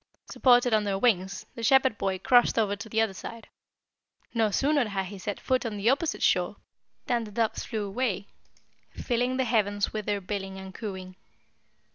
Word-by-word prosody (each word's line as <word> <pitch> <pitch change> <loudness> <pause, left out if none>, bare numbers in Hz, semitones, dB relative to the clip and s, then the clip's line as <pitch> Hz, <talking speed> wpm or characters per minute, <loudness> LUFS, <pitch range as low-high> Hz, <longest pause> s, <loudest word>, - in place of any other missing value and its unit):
Supported 245 -2 +4
on 215 -1 +3
their 200 -1 -1
wings, 195 -3 +1
the 230 - -8
Shepherd 265 +1 +4
boy 190 -1 0
crossed 245 +5 +4
over 210 -3 +2
to 205 +2 -9
the 220 - 0
other 220 -3 +2
side. 230 +4 -9 0.8
No 225 -2 +2
sooner 280 +4 +2
had 195 -2 -2
he 195 +1 -9
set 205 +2 -4
foot 255 -1 0
on 220 -3 -4
the 210 +5 +3
opposite 290 +3 -1
shore - - +2 0.5
than 240 -3 0
the 215 - -9
doves 225 +1 -1
flew 215 -3 -3
away, 200 -2 -2 0.7
filling 245 +1 -1
the 260 - +2
heavens 205 -3 +1
with 215 -2 -4
their 205 -1 0
billing 195 0 -5
and 190 0 -9
cooing. 185 -4 -7
215 Hz, 180 wpm, -27 LUFS, 195-245 Hz, 0.8 s, Supported